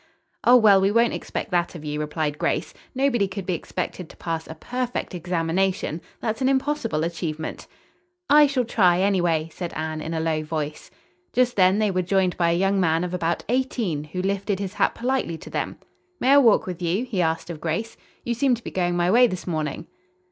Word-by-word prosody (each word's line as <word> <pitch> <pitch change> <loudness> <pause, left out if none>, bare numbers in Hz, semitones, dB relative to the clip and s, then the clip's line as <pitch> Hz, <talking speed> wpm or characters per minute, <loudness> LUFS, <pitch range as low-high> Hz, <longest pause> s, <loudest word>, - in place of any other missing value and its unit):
"Oh, 245 - +7
well, 205 -4 +6
we 195 - +3
won't 230 +3 +3
expect 220 - -5
that 175 0 0
of 155 -2 -8
you," 150 0 -3
replied 150 0 -2
Grace, - - -1 0.2
"Nobody 255 -6 +2
could 190 0 -6
be 185 - -1
expected 180 0 -5
to - - -15
pass 165 -1 -4
a 160 - -8
perfect 245 +6 -3
examination. 175 0 -1 0.2
That's 220 +2 -2
an 260 - +3
impossible 265 - 0
achievement." 160 -2 -4 0.6
"I 295 0 +7
shall 265 -3 0
try, 180 -6 +3
anyway," 175 -5 +1
said 175 -2 -5
Anne 155 0 -3
in 165 +2 -4
a - - 0
low 160 -1 0
voice. 150 -1 -4 0.4
Just 250 +1 +2
then 185 0 +4
they 215 -2 +2
were 185 -1 +1
joined 185 0 +1
by 170 -1 +2
a 170 - +2
young 195 +1 +2
man 165 -2 +2
of 180 0 -4
about 170 -1 -1
eighteen, 235 - -1
who 180 +4 -4
lifted 200 +1 -1
his 195 0 -4
hat - - +1
politely 245 -9 -1
to - - -12
them. - - -3 0.4
"May 260 - +3
I 285 - +8
walk 235 -6 +4
with 180 -2 -6
you?" 180 +8 0
he 215 -8 -1
asked 165 0 -1
of 160 - -8
Grace. 170 +8 -2 0.3
"You 240 - 0
seem 255 +1 +2
to 235 - -13
be - - -6
going 175 -1 0
my 175 +1 +2
way 245 +3 +6
this 185 -5 -5
morning." 155 -4 -3
185 Hz, 205 wpm, -24 LUFS, 165-225 Hz, 0.6 s, I